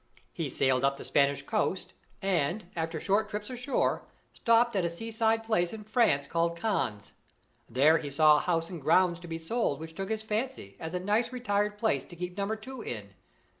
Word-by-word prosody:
He - - -3
sailed 130 -1 +1
up 140 0 +2
the - - -8
Spanish 140 -1 +2
coast, 200 -2 -1 0.3
and, 180 +1 0
after 165 -1 -2
short 205 +4 +1
trips 210 +2 -5
ashore, 250 +2 0 0.3
stopped 230 0 +3
at 190 - +2
a 170 - +1
seaside 225 +4 0
place 195 -6 +1
in 220 -1 -7
France 215 - +2
called 170 +2 0
Cannes. 165 - -2 0.6
There 145 +7 +5
he 145 - -5
saw 150 +2 +6
a - - +1
house 165 0 0
and 170 -4 -6
grounds 175 +4 +3
to 175 - -10
be 165 -1 -4
sold 165 - -1
which 160 0 -8
took 195 +4 -5
his 220 -1 -2
fancy 220 - -3
as 160 +2 -5
a - - 0
nice 210 +6 +1
retired 210 -4 0
place 220 +1 +1
to 175 - -11
keep 180 +1 -5
Number 200 +2 -1
Two 255 +3 -8
in. 105 - -6
180 Hz, 195 wpm, -29 LUFS, 160-220 Hz, 0.6 s, saw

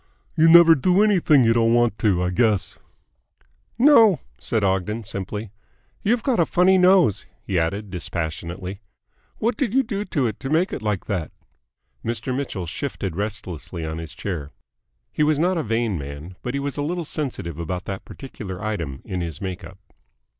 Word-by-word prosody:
"You 160 +1 +5
never 170 0 +9
do 180 +7 +3
anything 175 -10 +4
you 115 0 +4
don't 115 0 +3
want 120 -3 +2
to, 95 -5 +2
I 90 - 0
guess?" 105 +1 +1 1.0
"No," 230 - +6 0.2
said 110 -2 -1
Ogden 100 +4 0
simply. 100 +1 -5 0.5
"You've 230 +2 +1
got 255 -5 +1
a 170 - +5
funny 185 +1 +4
nose," 180 - +4 0.2
he 95 -4 0
added 100 +5 -2
dispassionately. 90 +2 -5 0.6
"What 235 +3 0
did 255 -5 -1
you 270 - +4
do 205 -4 -3
to 145 -9 0
it 110 -3 -3
to 135 - -5
make 165 +5 +1
it - - -4
like 105 -3 -2
that?" 90 -8 -3 0.7
Mr. 115 +2 -2
Mitchell 125 -9 -3
shifted 95 - -4
restlessly 95 -5 -5
on 80 +1 -4
his 80 -1 -7
chair. 85 -5 -4 0.6
He - - -3
was 150 0 +3
not 175 +3 +1
a - - +1
vain 115 - -1
man, 70 +6 -8
but 125 +2 -4
he - - 0
was 140 0 -3
a - - -1
little 170 +3 -2
sensitive 125 - -4
about 90 +2 -4
that 95 -1 -5
particular 105 -9 -8
item 85 -11 -4
in 95 -3 -3
his 85 -3 -5
make 95 -1 -5
up. 90 +3 -11
110 Hz, 175 wpm, -23 LUFS, -, 1.0 s, never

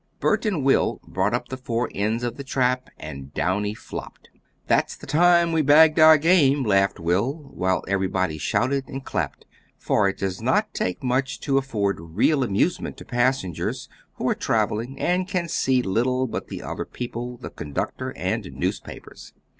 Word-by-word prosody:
Bert - - +1
and 180 -10 0
Will 135 - +2
brought 105 - 0
up 120 0 -4
the 130 - -5
four 120 -1 -2
ends 110 +4 -1
of 120 -1 -2
the 140 - -7
trap 130 -1 0
and 70 0 -8
Downy 105 +4 0
flopped. - - -9 0.3
"That's - - +1
the - - -12
time 170 +1 +4
we 160 -1 +2
bagged 155 +2 +6
our 155 0 +9
game," 145 -4 +4
laughed 100 -3 +2
Will, 120 - -1
while 95 0 0
everybody 95 -4 0
shouted 130 - 0
and 135 0 -7
clapped, - - -3 0.3
for 100 -2 +2
it 95 - -5
does 95 -2 -3
not - - +1
take 90 +6 -2
much 130 +1 0
to 135 -1 +2
afford 105 -9 -1
real 100 - +1
amusement 120 - 0
to - - -11
passengers, 120 - -1 0.3
who - - -2
are - - +3
traveling 120 +6 -1
and 180 +1 +1
can 180 -3 -1
see 130 -6 +1
little 125 +6 +1
but 120 - -5
the - - -7
other - - -4
people, 120 0 -6
the 125 - -8
conductor, 75 -4 -4
and - - -2
newspapers. - - -6
125 Hz, 170 wpm, -24 LUFS, 100-140 Hz, 0.3 s, our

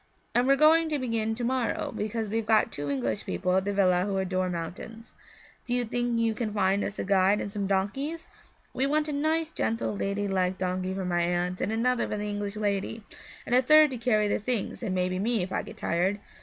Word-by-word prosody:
And 245 +1 +2
we're 275 - +6
going 315 +2 +5
to 300 - 0
begin 225 -4 -1
to 240 - -5
morrow 250 0 -1
because 220 +1 -2
we've 220 +1 -2
got 220 -1 +3
two 145 0 -4
English 120 -6 -1
people 180 - -1
at 190 0 +1
the 205 - 0
villa 185 -2 +3
who 200 -1 -1
adore 185 -1 -1
mountains. 180 +7 -7 0.5
Do 245 - -1
you 245 -1 +1
think 240 +1 -1
you 230 -1 +2
can 220 -1 -3
find 195 0 +2
us 200 - -4
a - - -2
guide 195 +1 +3
and 200 - -5
some 200 -2 -2
donkeys? 270 - -2 0.5
We 265 - 0
want 305 +1 +1
a - - -2
nice, 315 +2 0
gentle, 225 -7 -1
lady 200 +1 -2
like 185 -1 0
donkey 185 0 -2
for 190 -1 -3
my 175 -1 +1
aunt, 175 +1 -1
and - - -1
another 235 +2 +1
for 210 - -3
the 210 0 -3
English 205 0 -3
lady, 210 +1 -2 0.4
and - - -3
a 250 - +6
third 305 +2 +6
to 255 - -4
carry 215 -3 +2
the - - 0
things 225 0 -3
and 200 -6 -2
maybe 185 0 0
me, 220 -1 +1
if 185 - -6
I - - 0
get - - -11
tired. 185 +4 0
210 Hz, 225 wpm, -27 LUFS, 190-245 Hz, 0.5 s, we're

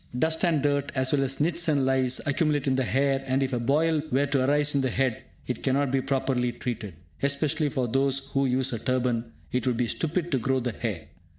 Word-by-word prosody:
Dust 160 +4 +1
and 160 -5 +2
dirt, 145 -1 0
as 130 -1 0
well 140 -2 +2
as 135 0 -2
nits 170 +3 +1
and 145 -4 +2
lice, 130 -1 +1
accumulate 145 0 +1
in 135 -2 +2
the 130 - +1
hair, 135 +5 +1
and 130 +1 +1
if 135 0 -2
a 120 - 0
boil 150 +6 +2
were 140 +3 +2
to 140 -2 +1
arise 145 +2 +2
on 140 - +2
the 130 - 0
head, 130 -2 0 0.2
it 125 - -4
cannot 135 0 +1
be 135 0 +1
properly 130 -2 0
treated. 115 -6 -5 0.3
Especially 145 +2 +1
for 130 -2 -1
those 135 +2 0
who 135 0 +1
use 130 0 +1
a 115 - -2
turban, 120 -2 -1 0.2
it 125 0 -1
would 125 -2 +1
be 125 - +1
stupid 165 +7 -2
to 135 - +2
grow 130 +3 +1
the 120 -1 -2
hair. 105 -8 -4
135 Hz, 225 wpm, -26 LUFS, 125-145 Hz, 0.3 s, and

